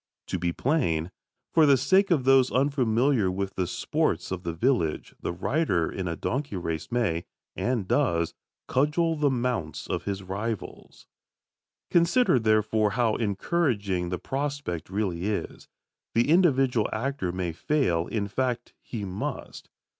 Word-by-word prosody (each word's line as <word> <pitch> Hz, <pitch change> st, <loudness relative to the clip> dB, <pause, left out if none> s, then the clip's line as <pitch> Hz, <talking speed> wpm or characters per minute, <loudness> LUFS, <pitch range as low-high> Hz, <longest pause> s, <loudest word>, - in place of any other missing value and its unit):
To 95 Hz, -, -1 dB
be 85 Hz, 0 st, 0 dB
plain, 90 Hz, -, 0 dB, 0.4 s
for 160 Hz, -2 st, +6 dB
the 140 Hz, -1 st, +6 dB
sake 190 Hz, +10 st, +3 dB
of 160 Hz, -7 st, +2 dB
those 135 Hz, -1 st, +5 dB
unfamiliar 130 Hz, -4 st, +2 dB
with 95 Hz, +1 st, -3 dB
the 90 Hz, -2 st, -1 dB
sports -, -, -1 dB
of 95 Hz, -2 st, -3 dB
the 85 Hz, -, -3 dB
village, 85 Hz, -, 0 dB
the -, -, -2 dB
rider 95 Hz, -, 0 dB
in 95 Hz, -2 st, -4 dB
a 85 Hz, -, -2 dB
donkey 130 Hz, -, -3 dB
race 80 Hz, -3 st, -4 dB
may, 105 Hz, -9 st, 0 dB, 0.3 s
and 120 Hz, -6 st, -1 dB
does, 85 Hz, -3 st, +1 dB, 0.3 s
cudgel 160 Hz, +5 st, +2 dB
the 150 Hz, -2 st, +2 dB
mounts 120 Hz, -, -2 dB
of -, -, -3 dB
his 100 Hz, -1 st, -3 dB
rivals. 105 Hz, +3 st, -5 dB, 0.9 s
Consider, 175 Hz, -, +4 dB
therefore, 110 Hz, -1 st, +2 dB
how 115 Hz, -3 st, +3 dB
encouraging 100 Hz, -, 0 dB
the 90 Hz, -, -2 dB
prospect 140 Hz, -, -3 dB
really 95 Hz, -3 st, -2 dB
is. 105 Hz, -1 st, -4 dB, 0.5 s
The 120 Hz, +5 st, +3 dB
individual 135 Hz, -, +3 dB
actor 115 Hz, -5 st, -2 dB
may 90 Hz, -1 st, -2 dB
fail 85 Hz, -, 0 dB
in 105 Hz, -3 st, -2 dB
fact, 120 Hz, +2 st, -2 dB
he 110 Hz, -4 st, -5 dB
must. 95 Hz, 0 st, -5 dB
110 Hz, 140 wpm, -27 LUFS, 90-135 Hz, 0.9 s, for